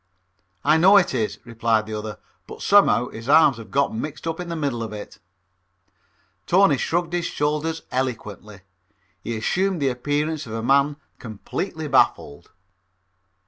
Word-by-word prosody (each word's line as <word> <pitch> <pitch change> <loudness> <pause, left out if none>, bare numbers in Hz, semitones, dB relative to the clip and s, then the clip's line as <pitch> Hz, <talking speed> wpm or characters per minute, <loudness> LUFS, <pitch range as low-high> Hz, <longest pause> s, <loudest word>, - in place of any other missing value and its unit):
"I 150 +2 +4
know 190 +5 +6
it 185 -7 +2
is," 110 -4 -2
replied 115 -2 0
the 110 - -7
other, 105 0 -5 0.3
"but - - -9
somehow 200 - +4
his 115 +3 -9
arms 150 -4 +5
have 115 -2 -11
gotten 140 -5 0
mixed 155 +1 -7
up 165 0 -3
in 180 -1 -6
the 170 - -3
middle 140 -7 -2
of 110 - -5
it." 105 -1 -9 1.3
Tony 185 -5 +4
shrugged 175 0 -1
his 175 -1 -1
shoulders 150 +2 -2
eloquently. 105 -5 -4 0.6
He 115 0 -3
assumed 185 - 0
the 140 -2 +1
appearance 145 +3 -2
of 110 - -7
a 115 0 -4
man 140 +3 +3 0.2
completely 150 - -5
baffled. 130 - +1
140 Hz, 150 wpm, -23 LUFS, 115-160 Hz, 1.3 s, know